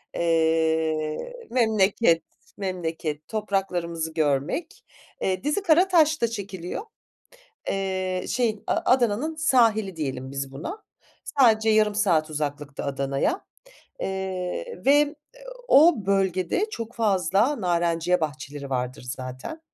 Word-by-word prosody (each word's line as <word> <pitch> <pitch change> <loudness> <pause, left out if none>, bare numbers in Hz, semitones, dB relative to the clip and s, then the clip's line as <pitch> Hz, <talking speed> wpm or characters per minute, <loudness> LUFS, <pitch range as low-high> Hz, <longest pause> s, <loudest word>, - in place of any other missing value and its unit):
eee, 160 - +1 0.2
memleket, 215 -7 +3 0.3
memleket 165 -5 -4
topraklarımızı 180 -6 -2
görmek. 150 - -1 0.4
Eee, 185 +1 -1
dizi 295 +8 0
Karataş'ta 320 -6 +4
çekiliyor. 200 - -5 0.9
Eee, 185 -1 -2
şeyin, 230 -4 0
A - - +2
Adana'nın 255 +5 +2
sahili 225 - +3
diyelim 135 -4 -4
biz 135 -1 -4
buna, 345 - -7 0.6
sadece 220 -3 +5
yarım 215 -1 +3
saat 170 -6 +2
uzaklıkta 145 -1 -4
Adana'ya. 140 - -1 0.5
Eee, 190 - -4
ve 290 +1 +4 0.5
o 320 - +7
bölgede 195 - +1
çok 230 - -6
fazla 210 - +2
narenciye 175 -1 +1
bahçeleri 145 -2 -5
vardır 125 -1 -3
zaten. 130 - -7
185 Hz, 95 wpm, -25 LUFS, 155-230 Hz, 0.9 s, o